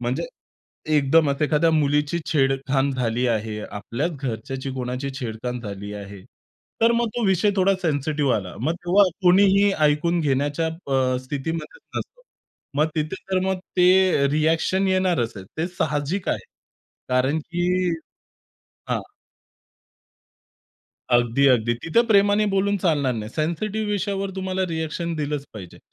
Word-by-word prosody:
म्हणजे - - -2 0.7
एकदमच 145 0 +3
एखाद्या 155 +2 +3
मुलीची 150 +1 +1
छेडखान 135 -1 +1
झाली 125 -1 0
आहे. 110 -1 -2
आपल्याच 120 +11 -3
घरच्याची 130 +1 -4
कोणाची 125 +2 -3
छेडखान 120 +1 -4
झाली 100 -1 -7
आहे. 100 -1 -9 0.6
तर 230 +1 +5
मग 235 0 +1
तो 240 - 0
विषय 190 +2 +3
थोडा 195 +1 +4
सेन्सिटिव्ह 145 -3 0
आला. 95 -4 -6
मग 160 +6 0
तेव्हा 195 +3 +5 0.2
कोणीही 195 +2 +5 0.2
ऐकून 170 +4 +1
घेण्याच्या 145 +2 0
अ, 135 -6 -1
स्थितीमध्येच 160 - -5 0.2
नसतो. - - -5 0.6
मग 150 - +3
तिथे 155 +3 -1 0.2
तर 190 - +2
मग 190 -1 0 0.2
ते 180 -5 +5
रिअ‍ॅक्शन 160 +5 +1
येणारच 185 -11 +1
आहे. 95 - -8
ते 160 - 0
साहजिक 155 +1 -2
आहे - - -3 0.6
कारण 130 +4 +2
की 175 0 0 1.2
हां. - - 0 2.1
अगदी, 120 +3 +3
अगदी. 120 -2 +3
तिथं 230 +9 +2
प्रेमाने 205 -1 +4
बोलून 200 +1 +2
चालणार 145 -7 +2
नाही. 110 -1 -5
सेन्सिटिव्ह 205 - -2
विषयावर 195 -1 -1
तुम्हाला 190 0 -2
रिअ‍ॅक्शन 165 +1 -3
दिलंच 150 -1 -2
पाहिजे. 95 -5 -10
150 Hz, 125 wpm, -23 LUFS, 130-185 Hz, 2.1 s, तर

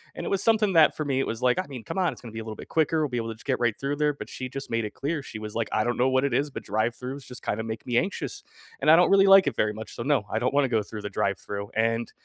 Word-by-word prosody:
And - - -5
it - - -2
was 195 - 0
something 215 -3 +3
that 160 -3 +5
for 155 - -2
me, 135 -2 0
it - - 0
was 115 +1 -4
like, 125 +6 +3
"I - - -1
mean, 130 -6 -8
come - - -5
on, 180 -3 +2
it's - - -12
gonna 115 -3 -10
be 110 - -5
a - - -5
little 110 -1 -7
bit - - -10
quicker, 160 0 +1
we'll 150 - +1
be 125 - -4
able 115 -1 -2
to 110 - -5
just 110 - -17
get 130 -2 +1
right 120 -2 +2
through 140 +1 -1
there," 150 0 +1
but 145 - -8
she 130 -1 -6
just 135 +1 -7
made 115 -1 0
it 105 - -5
clear, 145 +1 -3
she 105 - -8
was 105 0 -7
like, 115 -1 -1
"I 110 - +1
don't 120 0 0
know 130 +2 +3
what 130 +1 +2
it 140 - -1
is, 145 +1 +1
but - - -6
drive-throughs 120 +6 -2
just 125 - -10
kinda 110 +2 -2
make 110 -1 -6
me 120 -2 0
anxious. 190 +9 -2 0.4
And - - +5
I 165 - +8
don't 180 - +5
really 195 0 +6
like 195 0 +8
it - - 0
very 105 0 +1
much, 110 +1 -8
so, 115 - -4
no, 140 -6 +1
I 110 - -1
don't 125 +3 0
wanna 140 -1 +3
go 110 -4 +1
through 105 0 -8
the 105 - -3
drive-through," 100 +1 -3
and, 115 +1 0
125 Hz, 345 wpm, -26 LUFS, 110-145 Hz, 0.4 s, I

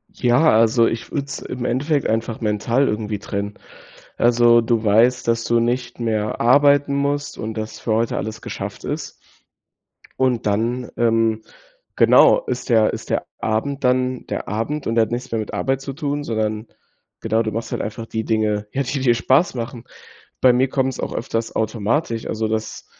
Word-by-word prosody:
Ja, 125 +6 +3
also, 115 +1 +4
ich 115 - -4
würde 140 -2 -2
es 140 - -6
im 125 -1 -6
Endeffekt 140 +4 0
einfach 115 +1 -2
mental 115 +5 +1
irgendwie 105 -1 -2
trennen. 100 -1 -4 0.6
Also, 120 0 +5
du 115 -1 0
weißt, 115 +4 +3
dass 115 0 +1
du 120 0 +2
nicht 120 +1 -2
mehr 110 -2 -1
arbeiten 140 +3 +4
musst 140 +1 -1
und 110 +1 -4
dass 110 0 -5
für 110 - -1
heute 115 +1 0
alles 110 +1 -5
geschafft - - -6
ist. - - -4 1.1
Und 130 -3 +1
dann, 115 +4 -1
ähm, 115 -1 +2 0.5
genau, - - +6
ist 440 - -4
der 110 -2 +4
ist - - -7
der - - -1
Abend 135 +5 -2
dann 125 0 +1
der - - -4
Abend 115 +8 -3
und 115 - -1
der 115 - +5
hat 110 - -4
nichts 125 +1 -4
mehr 115 - 0
mit 110 - -5
Arbeit 135 0 0
zu 135 0 -6
tun, 145 +1 -3
sondern 110 -1 -2 0.5
genau, 110 +1 +1
du 110 -1 -2
machst 115 +1 -4
halt - - -2
einfach 115 +2 -5
die 110 -1 -4
Dinge, 105 -1 0
ja, 140 - 0
die 135 +2 -3
dir 125 -2 +3
Spaß 130 - +2
machen. 120 0 -6 0.6
Bei 130 - +7
mir 125 +2 +2
kommt's 130 -1 -1
auch - - -3
öfters 115 -2 -3
automatisch, 115 +3 -1
also, 110 0 -2
dass, 110 -1 -4
115 Hz, 180 wpm, -21 LUFS, 110-130 Hz, 1.1 s, Bei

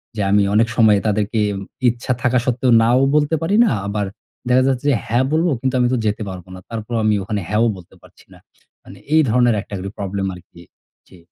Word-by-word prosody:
যে 105 - -2
আমি 100 0 +4
অনেক 115 +2 +4
সময়ে 110 -4 +5
তাদেরকে 105 +1 0 0.5
ইচ্ছা 120 +2 -4
থাকা 125 0 +2
সত্ত্বেও 125 0 +1
নাও 120 +3 +3 0.2
বলতে 150 +1 +2
পারি 170 +5 0
না। - - +1 0.2
আবার 105 0 -2 0.4
দেখা 130 +1 +4
যাচ্ছে 130 0 -1
যে, - - +2
হ্যাঁ, 120 +3 +1
বলবো। 165 +2 +2
কিন্তু 130 0 -1
আমি 125 - +3
তো - - +1
যেতে 105 +1 -1
পারবো 90 -2 -9
না। - - -10
তারপরও 115 +1 -4
আমি 105 -1 +3
ওখানে 105 +1 -3
হ্যাঁও 110 +2 +2
বলতে 90 -2 -16
পারছি - - -20
না। - - -17 0.4
মানে - - -13 0.2
এই 160 - +6
ধরনের 120 0 +3
একটা 105 - -13
করে 95 +1 -5
প্রবলেম 100 0 -3
আরকি 90 -1 -16 0.5
জি। 95 - -17
115 Hz, 205 wpm, -19 LUFS, 105-125 Hz, 0.5 s, এই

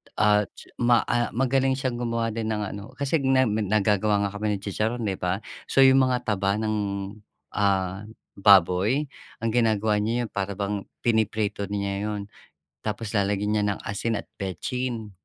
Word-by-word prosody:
At 105 -1 +3
ts - - -13
ma 120 -1 +4
ah, 120 -2 +1
magaling 135 +1 +2
siyang 130 -3 -2
gumawa 115 -1 -1
din 110 0 -3
ng 105 - -2
ano. 100 - -7
Kasi 140 +4 0
nem 130 -3 +3
nag 105 -1 -1
naggagawa 105 0 +2
nga - - -11
kami 105 0 -1
ni - - -3
chicharon, 110 +4 -2
'di 100 -3 -1
ba? 90 +3 -1 0.3
So, 135 - +3
'yong 135 0 +7
mga 125 -2 +2
taba 100 -2 +1
ng, 110 -1 0 0.8
ah, 95 0 0 0.3
baboy 100 - +5 0.4
ang 115 - +1
ginagawa 110 -2 +2
niya 115 +3 0
'yon 115 - -5
para 100 0 -3
bang 100 0 -3 0.2
piniprito 110 -3 0
niya 100 0 -2
'yon. 105 -1 -3 0.7
Tapos 105 0 -3
lalagyan 100 +1 +1
niya 105 - +2
ng - - -12
asin 105 +3 -2
at - - -5
betsin 110 +4 -3
105 Hz, 170 wpm, -25 LUFS, 100-120 Hz, 0.8 s, yong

